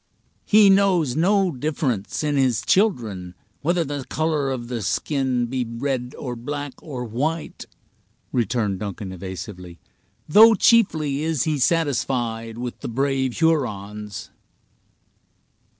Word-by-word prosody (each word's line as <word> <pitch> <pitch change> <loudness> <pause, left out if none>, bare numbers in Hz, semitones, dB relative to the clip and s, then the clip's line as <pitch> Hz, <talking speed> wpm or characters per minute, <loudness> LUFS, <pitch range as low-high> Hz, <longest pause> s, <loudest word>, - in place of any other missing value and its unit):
"He 210 -2 +6
knows 185 -9 +3
no 190 +2 +3
difference 130 -6 -2
in 150 -1 0
his 130 -5 +2
children, 110 - 0 0.3
whether 170 +3 +1
the 145 -2 -4
color 155 -3 0
of 125 -3 -4
the 120 -2 -4
skin 130 - 0
be 125 +1 -2
red, 125 +2 -3
or 125 -4 -5
black, 145 +3 -5
or 130 -6 -6
white," 150 +8 -3 0.7
returned 110 -5 0
Duncan, 100 -1 -5
evasively; 90 -1 -8 0.5
"though 220 +7 +8
chiefly 160 - +3
is 160 -4 0
he 155 -2 -1
satisfied 120 -7 0
with 120 0 -5
the - - -6
brave 135 0 -1
Hurons." 105 - -1
130 Hz, 120 wpm, -23 LUFS, 115-155 Hz, 0.7 s, though